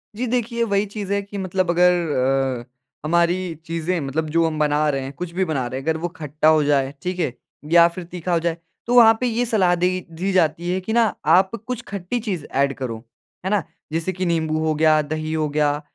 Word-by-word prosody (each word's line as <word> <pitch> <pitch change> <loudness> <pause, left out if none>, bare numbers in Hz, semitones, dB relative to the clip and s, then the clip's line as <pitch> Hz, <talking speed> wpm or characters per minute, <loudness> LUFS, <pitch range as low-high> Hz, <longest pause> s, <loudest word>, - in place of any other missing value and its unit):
जी, 245 +4 -2
देखिए 235 0 -1
वही 200 -2 +1
चीज़ 205 -1 -6
है 200 - +1
कि 200 0 -9
मतलब 185 -1 -1
अगर 180 +1 +5 0.7
अ, - - -22 0.4
हमारी 170 +2 +1
चीज़ें 165 +2 -2
मतलब 150 +3 -2
जो 165 +2 +2
हम 155 -1 -2
बना 150 0 +2
रहे 135 -2 -1
हैं, 135 +1 -5
कुछ 175 +4 -6
भी 190 +2 0
बना 145 -7 -1
रहे 130 +2 -4
हैं, 135 - -10
अगर 160 0 +1
वो 175 - -1
खट्टा 155 0 -1
हो 155 -1 +5
जाए, 140 -2 +1
ठीक 180 0 -3
है? 135 -8 0 0.4
या 170 0 +7
फिर 175 +1 -7
तीखा 175 0 -4
हो 170 - +3
जाए, 165 0 -1 0.3
तो 240 - 0
वहाँ 225 -2 +7
पे - - +1
ये 240 +1 0
सलाह 190 -6 +2
देगी 180 +1 +1 0.2
दी 190 +4 -1
जाती 175 -1 +1
है 185 - 0
कि 220 +4 -4 0.3
आप 185 +5 +5 0.2
कुछ 250 -1 -3
खट्टी 200 +4 -3
चीज़ 190 -10 -4
एड 140 0 +2
करो 125 -4 -4 0.5
है - - 0
ना? 205 -4 +2 0.3
जैसे 165 +3 -1
कि 185 +1 -3
नींबू 160 -2 0
हो 155 - +2
गया, 155 0 +4
दही 155 +1 -4
हो 155 -1 0
गया, 145 0 +1
170 Hz, 225 wpm, -22 LUFS, 155-190 Hz, 0.7 s, या